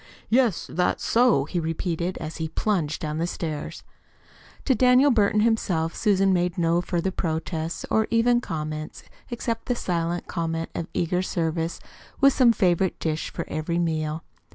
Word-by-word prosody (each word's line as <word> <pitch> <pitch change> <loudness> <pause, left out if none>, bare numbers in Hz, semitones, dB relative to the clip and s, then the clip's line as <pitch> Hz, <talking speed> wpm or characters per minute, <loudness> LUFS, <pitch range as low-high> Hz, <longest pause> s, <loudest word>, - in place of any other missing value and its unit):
"Yes, 235 -5 +2
that's 180 +1 -1
so," 230 - +4
he 175 - -2
repeated, 170 +2 -2
as 160 0 -6
he 160 -1 -3
plunged 160 -4 -1
down 155 0 -2
the 170 - 0
stairs. 155 -4 -5 0.8
To 265 - +4
Daniel 255 +4 +5
Burton 210 -2 +3
himself 185 -8 +1
Susan 195 -3 +3
made 175 -1 0
no 170 0 +2
further 175 +1 -1
protests 160 -1 -3
or 220 0 +2
even 240 +1 +3
comments 155 -4 -5 0.3
except 230 -1 -3
the 245 - +1
silent 175 -4 -2
comment 165 -1 -3
of 165 - -4
eager 180 +1 0
service 165 -2 -2 0.4
with 275 -1 +6
some 250 -3 +5
favorite 190 -4 +1
dish 155 -1 -2
for - - -5
every 155 +2 -2
meal. 160 -2 -1
175 Hz, 155 wpm, -25 LUFS, 160-215 Hz, 0.8 s, with